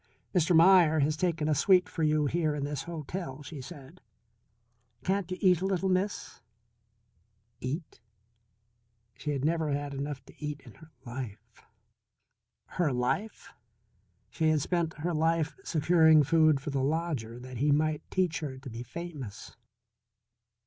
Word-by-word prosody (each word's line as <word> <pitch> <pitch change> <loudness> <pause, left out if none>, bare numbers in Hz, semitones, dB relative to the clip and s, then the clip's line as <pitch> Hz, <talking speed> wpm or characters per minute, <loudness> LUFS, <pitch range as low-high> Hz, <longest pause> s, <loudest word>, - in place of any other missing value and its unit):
"Mr. 175 -1 +3
Meier 170 -2 +6
has 150 +2 +1
taken 165 -2 0
a 155 - +3
suite 180 +5 +4
for 165 - -6
you 155 -1 +2
here 155 +1 0
in 145 - -3
this 145 +2 -3
hotel," 165 -3 -6
she 150 -1 -8
said. 135 +5 -12 1.0
"Can't 190 -1 0
you 185 - -3
eat 180 -3 +4
a 190 - 0
little, 190 0 0
Miss?" 185 -7 -2 1.2
Eat? 150 +6 -5 1.1
She 150 - -6
had 140 -1 -1
never 160 -1 +1
had 145 0 -2
enough 140 -1 -5
to - - -16
eat 150 -1 -3
in - - -14
her 160 -1 -16 0.2
life. 115 -3 -8 1.0
Her 170 -5 -1
life? 125 - -2 0.8
She 160 -1 +1
had 155 -1 +2
spent 170 0 -1
her 170 +3 -2
life 160 0 +1
securing 160 -1 +5
food 155 0 +4
for 145 +2 -5
the 140 -1 0
lodger 140 -6 -2
that 125 0 -9
he 145 +4 +2
might 155 +1 +1
teach 180 -3 0
her 140 -4 -5
to 130 0 -9
be 115 +1 -6
famous. 135 -5 -8
155 Hz, 150 wpm, -29 LUFS, 140-170 Hz, 1.2 s, Meier